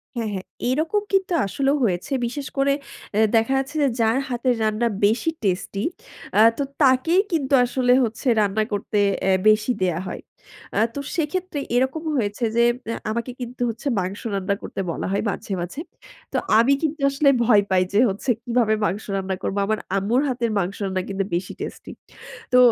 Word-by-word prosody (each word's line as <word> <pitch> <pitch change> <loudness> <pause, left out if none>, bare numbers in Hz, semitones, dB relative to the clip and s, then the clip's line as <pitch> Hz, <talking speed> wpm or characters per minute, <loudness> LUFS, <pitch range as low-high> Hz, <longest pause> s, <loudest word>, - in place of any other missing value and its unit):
হ্যাঁ, 230 -2 -2
হ্যাঁ 190 -1 -5 0.2
এরকম 315 +10 +1
কিন্তু 380 -2 +2
আসলেও 275 +8 +1
হয়েছে। 185 +2 -1
বিশেষ 265 +3 -4
করে 275 0 +3 0.4
এ্যা 220 +1 +4
দেখা 225 +4 +3
যাচ্ছে 270 +3 -3
যে - - +4
যার 225 +2 +3
হাতের 245 0 +1
রান্না 215 +2 +1 0.2
বেশি 225 +9 +2
টেস্টি 195 +1 -1 0.6
আ - - +8 0.2
তো 285 - 0 0.2
তাকেই 280 +7 +4
কিন্তু 290 -5 0
আসলে 250 0 +2
হচ্ছে 230 +3 -3
রান্না 210 +2 +1
করতে 205 +1 -2 0.3
এ্যা 190 -1 +4
বেশি 215 +3 +3
দেয়া 175 -2 0
হয়। - - -6 0.6
আ - - +4 0.2
তো 285 - -3 0.2
সেক্ষেত্রে 340 0 -2 0.2
এরকম 265 +6 +1
হয়েছে 215 -1 -1
যে 235 - +4 0.3
এ্যা 230 - -2
আমাকে 235 +3 -3
কিন্তু 245 +1 -7
হচ্ছে 235 +6 -5
মাংস 185 +2 -4
রান্না 195 +1 0
করতে - - -7
বলা - - -4
হয় 200 - 0
মাঝে, 200 - -5
মাঝে। 180 - -5 0.5
তো - - +1 0.2
আমি 245 +5 +5
কিন্তু 310 -1 -2
আসলে 280 +1 +3 0.2
ভয় 215 -3 +6
পাই 185 -1 +3
যে 205 - +4
হচ্ছে 200 +7 -4
কিভাবে 235 -2 +2
মাংস 205 +2 -2
রান্না 190 -1 -2
করব। 195 - -2
আমার 215 +1 0 0.2
আম্মুর 220 +7 +1
হাতের 240 -3 -1
মাংস 190 +1 -2
রান্না 190 -1 -1
কিন্তু 195 0 -1
বেশি 180 +1 -3
টেস্টি। - - -7 0.6
তো 250 - +6
235 Hz, 175 wpm, -23 LUFS, 200-270 Hz, 0.6 s, আ